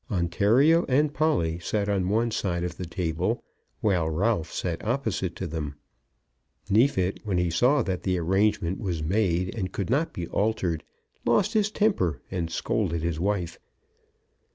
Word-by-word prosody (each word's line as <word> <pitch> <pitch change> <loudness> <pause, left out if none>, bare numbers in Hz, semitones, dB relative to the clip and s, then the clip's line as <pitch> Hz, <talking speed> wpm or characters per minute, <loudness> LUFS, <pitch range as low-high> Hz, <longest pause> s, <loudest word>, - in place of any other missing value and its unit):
Ontario 115 - +3
and 145 +3 +3
Polly 85 - +1
sat 100 +4 -1
on 95 -3 0
one 115 +3 +1
side 90 -5 -1
of 90 -2 -3
the 90 - -5
table, 90 +5 -1 0.4
while 90 -6 +2
Ralph 90 +2 0
sat 85 -2 -3
opposite 110 -7 -1
to 95 - -4
them. 75 -3 -4 1.0
Neefit, 100 -4 +3
when 100 -4 -1
he 90 -1 +1
saw 125 - +3
that 95 -3 -2
the 90 -1 0
arrangement 95 +1 +1
was 90 -7 -2
made 90 0 +1
and 95 -5 -3
could 100 +3 -3
not 150 +5 +1
be 85 - -4
altered, 95 -7 0 0.4
lost 210 +2 +2
his 215 -2 +2
temper 195 - +1
and 85 -3 -2
scolded 85 0 -1
his 85 -2 -1
wife. 90 -2 -1
95 Hz, 155 wpm, -26 LUFS, 85-115 Hz, 1.0 s, Ontario